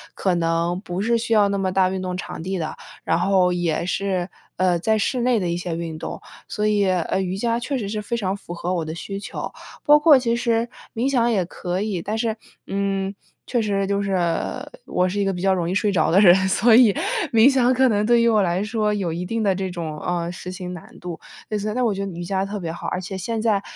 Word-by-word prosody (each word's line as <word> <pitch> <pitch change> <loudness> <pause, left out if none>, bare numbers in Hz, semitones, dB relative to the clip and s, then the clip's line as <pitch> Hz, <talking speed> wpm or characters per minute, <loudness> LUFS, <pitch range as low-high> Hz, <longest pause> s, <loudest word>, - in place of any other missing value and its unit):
可 185 -2 +1
能 170 +1 0
不 180 -2 -4
是 235 +3 +2
需 230 0 -1
要 210 -2 +5
那 200 0 -1
么 190 -1 0
大 185 0 +3
运 190 0 -3
动 180 -1 -3
场 170 - -6
地 190 +2 -2
的， 160 -3 -4 0.3
然 - - +2
后 180 -1 +3
也 170 -2 -1
是， 185 -1 -1 0.3
呃 180 -2 +2
在 220 +5 +2
室 245 +4 0
内 245 -1 +2
的 180 -3 -1
一 170 - 0
些 175 -1 -3
运 165 -1 -5
动。 - - -6 0.3
所 210 - -2
以， 210 -1 +2
呃， 185 +1 0
瑜 185 0 -2
伽 230 +2 0
确 270 +3 -2
实 215 -5 -3
是 210 +1 -3
非 235 +3 -3
常 195 -3 -1
符 200 - -11
合 175 +1 -3
我 170 -2 -1
的 160 - -5
需 195 +3 -5
求， - - -6 0.3
包 295 0 +7
括 295 -1 +7
其 235 -2 0
实 235 -1 +1 0.3
冥 235 +4 0
想 240 -3 +2
也 195 -5 +1
可 180 +1 -4
以， 205 -5 -2
但 210 +5 -3
是， 225 -1 -1 0.3
嗯， 195 0 -1 0.3
确 240 - 0
实 200 -2 0
就 200 +1 0
是 195 -1 0 0.7
我 180 - +1
是 195 +3 -2
一 200 - +1
个 195 - +1
比 180 - -5
较 195 0 +3
容 175 -2 -1
易 185 - -1
睡 205 +1 +2
着 170 -5 +2
的 185 - +5
人， 185 -4 +8 0.2
所 220 +4 +5
以 235 -3 +7 0.4
冥 230 0 +6
想 255 -3 +3
可 260 +1 +4
能 205 -2 +1
对 240 +1 +4
于 235 - +3
我 220 -2 +4
来 180 +1 0
说 210 0 0
有 190 -5 -2
一 175 +2 -4
定 225 +4 -2
的 200 -2 +3
这 190 0 -3
种， 165 -4 -5
呃， 175 0 -2
实 180 0 -7
行 180 -1 -6
难 175 - -12
度。 175 -2 -6 0.3
类 215 - -1
似 210 +1 -2
但 250 0 +1
我 220 - +2
觉 195 0 -3
得 195 - -5
瑜 175 +1 -6
伽 190 +1 -1
特 205 +1 -5
别 170 -3 -4
好， 170 - -6
而 - - -2
且 190 +2 -6
现 225 +5 -3
在 215 -3 +2
195 Hz, 275 characters per minute, -22 LUFS, 180-220 Hz, 0.7 s, 人